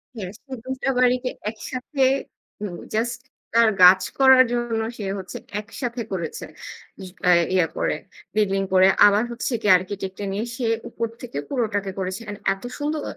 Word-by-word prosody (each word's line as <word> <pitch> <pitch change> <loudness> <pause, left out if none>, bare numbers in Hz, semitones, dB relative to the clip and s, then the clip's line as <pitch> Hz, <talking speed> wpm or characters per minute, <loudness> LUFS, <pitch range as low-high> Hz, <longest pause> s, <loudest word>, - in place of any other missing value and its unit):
হ্যাঁ 190 -4 -5
তো 270 - -20
২টা 260 +1 -3
বাড়িকে 250 0 +2 0.2
একসাথে, 255 +5 -3 0.6
উম 190 -4 -4 0.2
জাস্ট 235 +2 -1 0.3
তার 230 -1 +6
গাছ 185 +1 +9 0.2
করার 265 -1 +8
জন্য 240 -2 -1 0.2
সে 210 - -5 0.2
হচ্ছে 185 -1 -7 0.2
একসাথে 235 +2 -5
করেছে, 170 -4 -4 0.6
ই - - -7 0.2
কায় 180 -1 +5
ইয়া 180 -3 +3
করে - - 0 0.4
বিল্ডিং 195 -2 +2
করে। 185 0 +7 0.2
আবার 205 +2 +5
হচ্ছে 235 +1 -3
গিয়ে 205 -4 +6
আর্কিটেক্ট-এ 190 +1 -6
নিয়ে 210 +4 -2
সে 250 -2 -3 0.2
উপর 230 - -3
থেকে 240 - -7
পুরোটাকে 210 -6 -1
করেছে 190 +2 -3
এন্ড 205 - -6
এত 195 - -13
সুন্দর! 295 0 -2
220 Hz, 155 wpm, -23 LUFS, 190-250 Hz, 0.6 s, গাছ